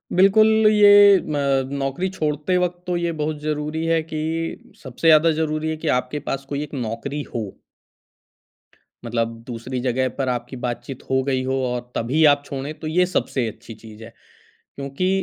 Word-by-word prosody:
बिल्कुल, 195 +4 +6 0.2
ये 210 -1 +6 0.3
अ, 140 -5 0 0.2
नौकरी 135 +7 -2
छोड़ते 155 0 -1
वक़्त 180 0 -2
तो 180 - 0
ये 170 0 -1
बहुत 150 0 -2
ज़रूरी 155 +1 -2
है 165 0 +2
कि 155 - -2 0.6
सबसे 130 +5 -3
ज़्यादा 160 +1 +6
ज़रूरी 155 0 -1
है 160 - -3
कि 160 - -6
आपके 125 +4 -5
पास 135 0 -3
कोई 145 0 -2
एक 150 - -10
नौकरी 130 +3 -4
हो। 115 - -1 1.6
मतलब 115 0 -2
दूसरी 125 +1 -5
जगह 130 +1 0
पर 135 -2 -1
आपकी 125 +1 -4
बातचीत 120 +2 -5
हो 130 0 +2
गई 130 -1 -1
हो 130 0 -1
और 125 0 -2
तभी 130 +8 +1
आप 145 -1 +4
छोड़ें, 140 +2 -5
तो 155 - -5
ये 180 +3 +2
सबसे 135 -8 -1
अच्छी 110 +1 -9
चीज़ 110 0 -13
है। 115 +1 -12 0.6
क्योंकि 140 +6 -2
140 Hz, 170 wpm, -22 LUFS, 125-160 Hz, 1.6 s, बिल्कुल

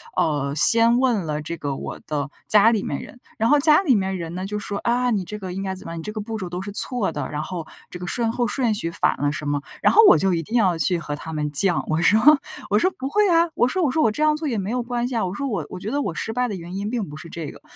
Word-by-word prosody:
呃， 145 -3 0
先 230 +9 +7
问 240 -8 +1
了 150 -1 -3
这 170 +3 -6
个 145 -3 -4
我 - - -7
的 145 -2 -3 0.2
家 215 +1 +7
里 220 -4 0
面 140 - -4
人。 245 - -12 0.2
然 225 - +2
后 295 - +5
家 300 +3 +5
里 290 -10 +3
面 190 -2 -1
人 170 -1 -6
呢， 185 +1 -4
就 210 +1 -4
说， 205 0 -5
啊， 245 +1 0
你 205 -6 -1
这 210 +4 -7
个 190 -2 -6
应 190 +2 -5
该 190 -1 -3
怎 185 - -10
么 165 - -6
样， - - -6
你 165 - -6
这 210 - -5
个 215 - -4
步 220 +1 -5
骤 190 -4 -5
都 175 +1 -5
是 205 +1 -6
错 220 +1 -1
的， - - -4
然 150 0 -3
后 170 0 -6 0.2
这 - - -8
个 180 - -7
顺 230 +5 -1
后 240 +1 -1
顺 235 -3 0
序 170 -5 -3
反 - - 0
了 145 0 0
什 150 -1 -5
么。 145 -1 -1 0.2
然 - - +4
后 445 - +6
我 - - +6
就 195 -1 +1
一 165 -1 -1
定 230 +10 -2
要 185 -7 +2
去 170 +3 +1
和 145 -3 -5
他 160 +2 -8
们 150 -1 -2
犟， 175 +4 +2
我 155 +1 0
说 205 +6 +4 0.5
我 205 - +3
说 370 - +2
不 265 - -4
会 415 +7 +2
啊， 335 0 +4
我 - - +3
说 375 +4 -1
我 300 - +2
说 315 +4 +1
我 225 - +3
这 255 - -5
样 305 0 +3
做 310 +1 -5
也 240 -5 -1
没 195 0 -3
有 245 +1 -1
关 240 0 -2
系 250 - -5
啊， 225 - 0
我 180 - -4
说 275 +7 -3
我 200 - -3
我 185 - -7
觉 195 - -5
得 285 +4 -1
我 200 -11 -3
失 220 +7 -4
败 250 +1 0
的 205 - -4
原 175 0 -8
因 200 +2 -3
并 225 -4 -3
不 145 - -9
是 160 +2 -10
这 165 -2 -6
个。 - - -11
200 Hz, 340 characters per minute, -22 LUFS, 170-240 Hz, 0.5 s, 先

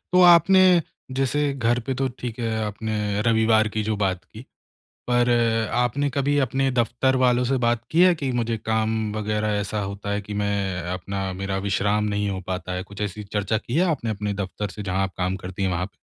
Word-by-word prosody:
तो 180 - +5
आपने 180 0 +6 0.3
जैसे 140 +2 +1
घर 120 -1 +1
पे 135 - -1
तो 135 +1 0
ठीक 120 -2 -5
है, 115 -1 -1 0.2
आपने 105 -1 -2
रविवार 110 -1 +3
की 110 - +1
जो 110 0 -1
बात 95 -3 -1
की, 110 +3 -12 0.7
पर 120 0 +3 0.5
आपने 140 +4 +1
कभी 140 +2 0
अपने 135 +2 0
दफ़्तर 125 +2 +1
वालों 125 -1 +3
से 135 +1 +1
बात 120 -1 +1
की 170 +2 +4
है 185 - +6
कि 135 -4 -2
मुझे 115 -1 -1
काम 110 0 0 0.2
वग़ैरह 105 0 -1
ऐसा 105 +1 -3
होता 100 +1 -5
है 105 0 -1
कि 105 +1 -8
मैं 100 -3 -1
अपना 95 +1 -4
मेरा 95 +1 -3
विश्राम 105 +2 +1
नहीं 105 -1 -1
हो 95 -1 -3
पाता 90 0 -3
है, 90 0 -3
कुछ 100 +1 -10
ऐसी 105 +1 -3
चर्चा 105 +1 -1
की 120 +3 -5
है 185 - +4
आपने 115 -7 -2
अपने 105 0 -3
दफ़्तर 100 +1 -4
से 105 +2 -7
जहाँ 95 0 0
आप 95 - -3
काम 95 +1 -1
करती 95 +1 -5
हैं 95 - +1
वहाँ 90 0 -1
पे? - - -11
110 Hz, 210 wpm, -24 LUFS, 100-125 Hz, 0.7 s, आपने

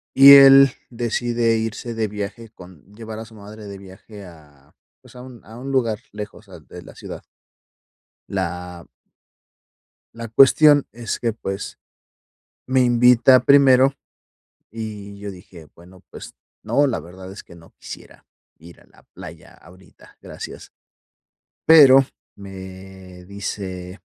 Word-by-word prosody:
y 140 +1 +9
él 135 -1 +8 0.2
decide 120 -1 -2
irse 115 +1 -5
de 110 -1 -3
viaje 105 +2 -8
con 90 -7 -17
llevar 110 -1 -9
a 110 - -9
su 110 0 -18
madre 105 +1 -13
de 100 -1 -10
viaje 100 +2 -14
a, 75 -5 -19 0.3
pues, - - -20
a 125 - -11
un 125 -2 -14
a 115 +2 -13
un 135 - -8
lugar 115 -5 -1
lejos, 105 0 -10
ah, - - -13
de - - -14
la - - -16
ciudad. - - -10 1.1
La 90 -2 -6 1.3
la 115 -1 -8
cuestión 145 +4 +4
es 115 -2 -6
que, 115 -2 -2
pues, 95 -2 -7 0.9
me 130 0 +1
invita 125 +1 +4
primero, 135 -1 +4 0.8
y 105 -2 -9
yo 100 0 -8
dije: 90 -4 -15
"Bueno, 90 +2 -19
pues - - -12 0.3
no, 145 - 0
la 120 -10 -2
verdad 95 +4 -13
es 100 - -12
que 85 - -17
no 80 -1 -19
quisiera - - -14 0.3
ir 85 +1 -16
a - - -23
la - - -25
playa - - -13
ahorita, 90 +3 -21
gracias". - - -11 1.0
Pero 135 -4 +7 0.3
me 95 -1 -13
dice, 95 -1 -8
105 Hz, 135 wpm, -20 LUFS, 95-120 Hz, 1.3 s, y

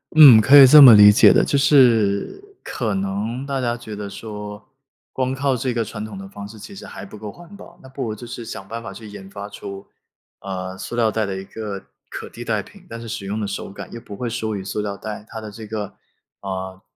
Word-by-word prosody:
嗯， 140 -8 +10
可 130 +7 +6
以 140 - +11
这 150 +3 +9
么 130 -4 +11
理 105 -1 +9
解 105 - +6
的， - - +4
就 140 - 0
是 125 - +3 0.2
可 110 -4 -3
能 100 +6 -3
大 140 -1 -3
家 120 -2 -1
觉 115 -3 -10
得 100 -1 -6
说 105 -1 -9 0.4
光 130 0 -2
靠 135 0 0
这 125 +1 -2
个 115 -1 -1
传 105 0 -7
统 105 -2 -9
的 95 0 -9
方 100 0 -9
式 110 +2 -13
其 110 - -11
实 195 - -11
还 - - -9
不 105 - -12
够 105 0 -8
环 175 - -14
保， 170 -2 -15
那 130 - -13
不 135 0 -6
如 110 -3 -4
就 115 - -11
是 120 0 -8
想 95 -3 -8
办 115 +1 -6
法 100 -4 -8
去 110 +3 -11
研 95 -2 -11
发 100 +1 -8
出， 100 -1 -9 0.5
啊， 95 -1 -6
塑 120 - -7
料 115 -2 +2
袋 110 0 -1
的 100 -1 -4
一 95 - -6
个 100 -1 -8 0.2
可 - - -8
替 120 - -10
代 110 -3 -1
品， 190 -1 -18
但 115 - -8
是 115 - -9
使 110 -4 -6
用 105 +3 -3
的 - - -2
手 100 0 -5
感 100 - -10
又 115 - -8
不 105 - -11
会 120 +3 -4
输 110 -1 -3
于 95 - -5
塑 100 - -5
料 100 -1 -4
袋， 105 +1 -8
它 110 - -8
的 105 -1 -8
这 110 +1 -10
个， 105 -1 -4 0.5
啊， 95 -1 -6
110 Hz, 270 characters per minute, -21 LUFS, 100-120 Hz, 0.5 s, 以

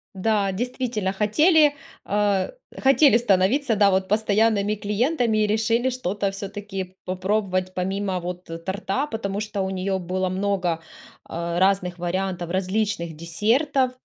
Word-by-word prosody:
Да, 200 0 +1
действительно 230 -2 -2
хотели 295 - +4 0.3
а 200 -2 +1 0.3
хотели 270 -2 +5
становиться, 225 +4 +2
да, 200 -1 +4
вот 190 0 +1
постоянными 210 0 +2
клиентами 220 +3 0
и - - +1
решили 225 +4 +1
что-то 205 -5 -2
всё-таки 195 -1 -6
попробовать 185 0 -1
помимо, 190 0 -1
вот, 180 +1 -6 0.2
торта, 200 +7 -1
потому 200 -3 -3
что 210 -2 -3
у 190 - -1
неё 190 +1 -1
было 185 +1 -2
много, 185 -3 -1 0.4
а, 170 +1 -3
разных 190 -2 +2
вариантов 180 0 -2
различных 190 -2 -1
десертов, 250 - +1
200 Hz, 125 wpm, -23 LUFS, 185-220 Hz, 0.4 s, хотели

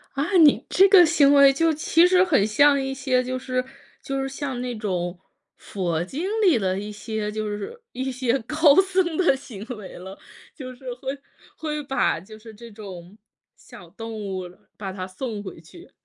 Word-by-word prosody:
啊， 275 - 0 0.2
你 295 - +4
这 390 - +5
个 375 -3 +8
行 295 -3 +4
为 280 -1 +7
就 325 +3 +2
其 330 +3 +3
实 370 0 +4
很 280 - +2
像 280 +6 +4
一 270 0 -3
些 255 -2 0
就 255 +1 -3
是 255 0 -2 0.4
就 275 -2 -3
是 270 - -2
像 270 -2 -5
那 250 -1 -4
种 180 -4 -3 0.4
佛 175 -4 -3
经 295 - -5
里 360 - +4
的 190 -3 -1
一 205 +1 -6
些 210 0 -4
就 215 0 -4
是 210 - -6
一 260 +1 -4
些 255 0 0
高 300 +4 +3
僧 370 -4 -1
的 355 -7 +3
行 215 -7 -10
为 195 -3 -10
了， 190 +2 -10 0.4
就 255 -4 -8
是 250 +2 -19
会 270 +2 -6 0.4
会 300 -2 -4
把 270 - 0
就 215 +4 -14
是 220 0 -13
这 230 +2 -13
种， 195 -3 -11 0.4
小 175 - -15
动 225 +1 -8
物 190 -3 -5 0.3
把 195 -2 -5
它 185 -1 -6
送 210 +2 -6
回 190 -5 -9
去。 340 - -16
255 Hz, 200 characters per minute, -23 LUFS, 205-285 Hz, 0.4 s, 个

